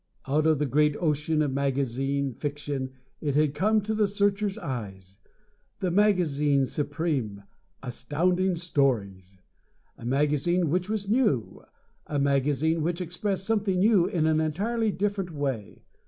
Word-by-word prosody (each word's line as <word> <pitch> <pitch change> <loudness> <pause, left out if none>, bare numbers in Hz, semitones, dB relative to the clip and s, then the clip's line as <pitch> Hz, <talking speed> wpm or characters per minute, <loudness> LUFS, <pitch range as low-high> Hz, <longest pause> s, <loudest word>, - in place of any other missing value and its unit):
Out 150 +3 +1
of 155 -1 +4
the 150 - 0
great 150 +2 +2
ocean 155 -1 +1
of 140 -3 -1
magazine 135 0 -1
fiction 145 0 -4 0.3
it 145 -3 -1
had 150 -1 +3
come 215 +6 +2
to 215 +2 -2
the 215 -1 +2
Searcher's 200 0 0
eyes, 95 -6 -6 0.6
the 185 -3 -1
magazine 155 -8 +3
supreme 145 -7 -2 0.4
Astounding 175 +8 0
Stories! 110 - -1 0.6
A - - -11
magazine 150 +6 +1
which 180 +3 0
was 210 -2 -2
new, 210 - +1 0.5
a 145 - -2
magazine 140 +3 +1
which 170 +3 -1
expressed 185 +2 -3
something 205 -4 +1
new 195 -2 +4
in 165 -3 0
an 160 0 +3
entirely 215 +9 0
different 200 -2 -2
way! 135 - -4
150 Hz, 135 wpm, -27 LUFS, 140-185 Hz, 0.6 s, of